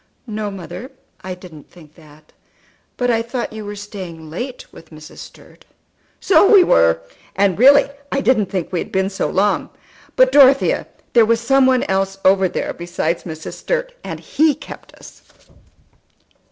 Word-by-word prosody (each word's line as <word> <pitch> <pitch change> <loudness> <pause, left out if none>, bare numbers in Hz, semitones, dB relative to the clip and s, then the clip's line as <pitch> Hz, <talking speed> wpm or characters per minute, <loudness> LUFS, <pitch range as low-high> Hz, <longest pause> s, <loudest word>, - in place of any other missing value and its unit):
"No, 215 -3 -4
mother, 195 +6 -8 0.3
I 185 -1 -5
didn't 175 -5 -14
think 155 -4 -18
that. 155 -2 -20 0.6
But 245 -1 +1
I 230 -1 +1
thought 235 0 -5
you 220 -1 -7
were 205 0 -7
staying 185 -6 -9
late 245 +10 -6
with - - -15
Mrs. 155 0 -13
Sturt." - - -15 0.6
"So 395 +1 +4
we 400 -4 +8
were, 80 - +3 0.3
and 195 -1 +1
really 280 +3 +6 0.2
I 275 - 0
didn't 245 -7 +2
think 185 -3 -4
we 175 - 0
had - - -6
been 190 +1 0
so 195 - -2
long. 200 +2 0 0.5
But, - - +4
Dorothea, 275 -1 +4 0.3
there 230 -2 +5
was 230 0 +2
some 260 +3 +3
one 255 -1 +2
else 195 0 -1
over 190 0 +4
there - - -4
besides 170 -1 -3
Mrs. 160 -2 -7
Sturt, - - -3
and - - -6
he 310 -2 +1
kept - - -12
us." - - -15
200 Hz, 165 wpm, -18 LUFS, 175-255 Hz, 0.6 s, we